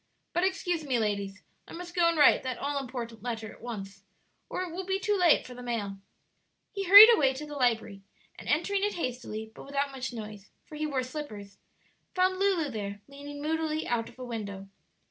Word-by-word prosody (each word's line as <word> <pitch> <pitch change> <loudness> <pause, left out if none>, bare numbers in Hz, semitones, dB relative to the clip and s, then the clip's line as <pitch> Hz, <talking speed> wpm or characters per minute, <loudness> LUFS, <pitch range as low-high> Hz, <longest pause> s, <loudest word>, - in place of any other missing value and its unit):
But 350 +2 +1
excuse 355 -3 0
me, 265 -4 0
ladies; 200 -2 -2 0.2
I - - -11
must 350 +1 -8
go 345 -1 +4
and 335 - -1
write 290 - +6
that 255 -2 -4
all 285 0 -2
important 235 -4 -6
letter 225 -2 -4
at - - -18
once, 200 -4 -7 0.5
or 365 - -2
it 360 - -6
will 375 +2 -4
be 380 +1 -1
too 415 +1 +1
late 355 -5 +4
for 250 - -9
the 250 - -10
mail." 220 -5 -3 0.7
He 395 -2 -4
hurried 410 +5 +11
away 270 - +3
to 300 +3 -6
the 295 - -9
library, 230 -7 0 0.4
and - - -8
entering 390 +7 +1
it 415 - 0
hastily, 240 -7 -5
but - - -11
without 280 0 -2
much 265 -1 -5
noise, 210 -3 -9 0.2
for - - -16
he 305 0 -2
wore 270 -3 -1
slippers, 215 -8 -8 0.6
found 370 0 +2
Lulu 370 -7 +1
there, 205 -2 -5
leaning 285 +1 -9
moodily 315 0 -1
out 230 -1 -1
of - - -18
a 255 - -7
window. 200 -5 -6
270 Hz, 205 wpm, -29 LUFS, 225-335 Hz, 0.7 s, hurried